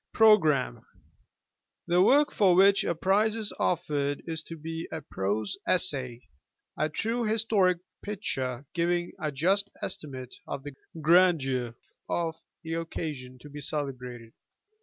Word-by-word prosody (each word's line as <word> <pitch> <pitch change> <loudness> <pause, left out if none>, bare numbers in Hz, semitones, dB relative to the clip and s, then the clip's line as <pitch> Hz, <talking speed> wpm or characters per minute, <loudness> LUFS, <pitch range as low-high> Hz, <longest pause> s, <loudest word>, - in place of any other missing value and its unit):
Pkogkam. 160 - +4 1.0
The 175 +1 +3
work 285 +9 +5
for 190 -4 +4
which 195 +2 +5
a 170 - -1
prize 205 +6 +2
is 220 -2 -2
offered 145 -5 0
is 160 -2 -3
to 165 - -8
be 165 +1 -5
a 160 - -3
prose 105 -4 -2
essay, 130 -9 +1 0.5
a 155 - 0
true 230 +9 -1
historic 215 -4 +2 0.2
picture 135 - -3
giving 175 0 0
a 155 - -2
just 190 +8 +1
estimate 130 -4 -5
of 135 - -5
the 145 -1 -7 0.3
grandeur 150 -8 +3 0.3
of 165 -2 0 0.3
the 165 0 -4
occasion 150 -6 -5
to 150 - -11
be 145 +1 -8
celebrated. 125 -6 -5
160 Hz, 130 wpm, -28 LUFS, 135-185 Hz, 1.0 s, work